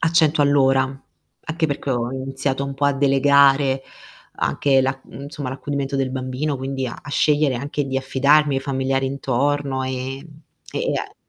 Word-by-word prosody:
a 160 - +2
100 160 -3 +3
all'ora, 135 -2 +4 0.6
anche 160 0 0
perché 140 -1 -3
ho 120 -1 -1
iniziato 135 +1 -2
un 140 - -5
po' 140 +1 -2
a 140 - +4
delegare 135 0 +4 0.5
anche 135 -2 +2
la 135 +1 0
mhmm, 140 - -11
insomma 145 -1 -6
l'accudimento 140 0 -3
del 135 -1 0
bambino, 130 +3 -2
quindi 135 0 -3
a 120 - -7
a 145 - -10
scegliere 150 -1 +2
anche 140 +4 -3
di 135 0 -2
affidarmi 140 +2 +3
ai 135 - 0
familiari 135 -1 -1
intorno, 140 +1 -1
e 130 0 -3
e 155 +1 -11
e - - 0
a - - -7
135 Hz, 170 wpm, -21 LUFS, 130-145 Hz, 0.6 s, all'ora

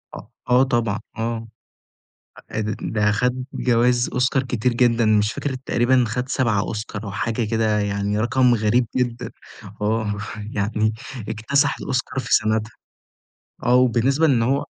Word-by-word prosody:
أ - - -6 0.3
آه 125 +1 +5
طبعًا 120 -6 0 0.2
آه، 115 0 -3 1.0
أ - - -2 0.2
ده 105 -1 +1
خد 125 +4 0
جوايز 120 0 +2
أوسكار 130 +1 +1
كتير 125 -1 -1
جدًا 120 -1 +3
مش 105 0 +2
فاكر 140 +2 -3
تقريبًا 125 0 +2
خد 125 +3 -3
7 115 -8 +1
أوسكار 105 0 -4
أو 100 - -5
حاجة 115 +3 -2
كده 110 -2 +1
يعني 100 0 -1
رقم 125 +2 +3
غريب 115 +3 +2
جدًا 120 -2 -2 0.5
آه، 110 0 0 0.4
يعني 110 +1 0 0.4
اكتسح 140 +7 +1
الأوسكار 130 0 -2
في 125 - -2
سَنتها 110 +1 0 0.9
آه، 120 - +3
وبالنسبة 130 +5 +3
لإن 130 -6 +3
هو 135 +4 0
115 Hz, 140 wpm, -22 LUFS, 110-125 Hz, 1.0 s, آه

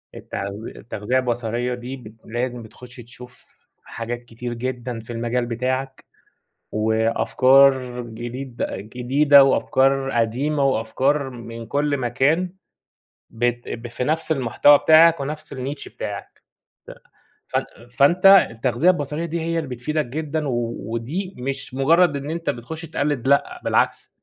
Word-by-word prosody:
التـغ 100 0 -5 0.3
التغذية 110 +3 -3
البصرية 120 0 -2
دي 125 +2 -6
بت 110 -4 -12
لازم 120 +1 -3
بتخش 125 +3 -14
تشوف 125 +1 -14 0.4
حاجات 120 +1 -5
كتير 120 +1 -6
جدًا 125 -1 -4
في 115 +2 -9
المجال 120 +1 -1
بتاعك، 130 +3 -3 0.7
وأفكار 125 +4 +3
جديد 120 +2 -7
جديدة 135 +7 +4
وأفكار 135 0 +2
قديمة 135 +6 0
وأفكار 135 +3 0
من 115 -1 -9
كل 145 +3 0
مكان، 140 +8 +1 0.8
بت 120 +1 -2
ب 120 +1 -6
في 125 +2 -4
نفس 160 +2 0
المحتوى 140 +1 +4
بتاعك 165 +1 +6
ونفس 150 +2 -6
ال 135 +2 -4
niche 140 - -10
بتاعك، - - -7 1.1
ف - - -1
فان 120 +2 -7
فأنت 175 +7 +4 0.3
التغذية 120 +8 +1
البصرية 155 -1 -1
دي 170 0 -3
هي 165 +1 -1
اللي 150 -5 -5
بتفيدك 155 +4 -2
جدًا، 150 +3 -3
و 120 -2 -2 0.2
ودي 170 +12 -4
مش 135 +1 -5
مجرّد 155 +4 +3
إن 140 +1 -5
أنت 165 -2 -3
بتخش 145 +6 -5
تقلّد 145 -5 -2
لأ، 140 0 +2
بالعكس - - +1
130 Hz, 130 wpm, -22 LUFS, 120-145 Hz, 1.1 s, بتاعك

